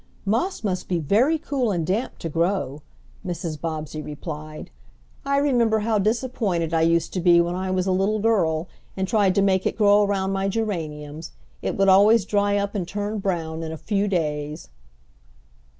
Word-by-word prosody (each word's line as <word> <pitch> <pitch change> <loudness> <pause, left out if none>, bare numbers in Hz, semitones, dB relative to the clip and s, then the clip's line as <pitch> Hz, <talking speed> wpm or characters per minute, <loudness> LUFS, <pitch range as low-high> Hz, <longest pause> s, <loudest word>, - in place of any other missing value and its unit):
"Moss 230 - -1
must 185 -3 -2
be 180 - +1
very 220 - +2
cool 270 -6 -1
and 170 -4 -1
damp 210 +9 -2
to - - -5
grow," 165 -3 -1 0.4
Mrs. 170 -5 -4
Bobbsey 155 -2 -4
replied. 155 - -7 0.6
"I 280 0 +2
remember 240 -6 +2
how 215 0 +1
disappointed 210 -6 -1
I 165 - +2
used 165 0 +2
to 185 - -1
be 175 -1 +5
when 170 +1 +1
I 185 +1 -3
was 185 -1 0
a 190 - +1
little 195 +3 +1
girl 185 -7 +1 0.3
and 190 0 -1
tried 200 -3 +2
to 200 - +3
make 190 -1 +2
it - - -3
grow 205 -1 +5
around 195 -1 0
my 195 0 -1
geraniums. 160 -7 -4 0.3
It - - -3
would 195 0 +3
always 200 +2 +6
dry 205 0 +1
up 200 0 -2
and 190 -5 -3
turn 205 +2 -3
brown 165 -4 -2
in 160 -1 -5
a 160 - -6
few 205 +3 -1
days." 150 -4 -2
190 Hz, 180 wpm, -23 LUFS, 165-210 Hz, 0.6 s, always